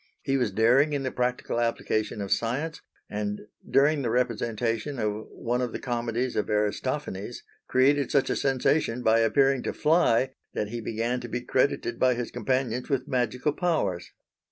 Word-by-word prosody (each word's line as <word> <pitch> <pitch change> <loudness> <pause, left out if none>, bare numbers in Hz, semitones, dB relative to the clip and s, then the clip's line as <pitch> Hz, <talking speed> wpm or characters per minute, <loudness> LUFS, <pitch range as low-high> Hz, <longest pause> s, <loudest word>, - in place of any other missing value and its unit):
He 135 - 0
was 125 -5 +1
daring 125 +9 +4
in 140 -1 -1
the 130 - -2
practical 125 -1 -1
application 110 -2 -1
of 100 - -5
science, 140 +8 -1 0.3
and 105 0 -3 0.3
during 145 +2 +4
the 120 - -1
representation 115 +1 -1
of 105 -1 -2
one 120 +1 -2
of 125 -2 -2
the - - -4
comedies 120 0 -2
of 105 - -1
Aristophanes, 105 +1 -2 0.2
created 140 +2 +3
such 140 - +2
a - - +1
sensation 130 -2 +1
by 110 0 +4
appearing 135 +3 +3
to - - -3
fly, 135 -6 +3 0.2
that 105 - -1
he 120 +1 -4
began 115 +3 -1
to 120 - -7
be 125 +2 -3
credited 130 +3 0
by 130 -1 +4
his 120 0 -4
companions 125 0 -1
with 130 -2 0
magical 125 +3 0
powers. 105 - -1
125 Hz, 165 wpm, -27 LUFS, 115-135 Hz, 0.3 s, daring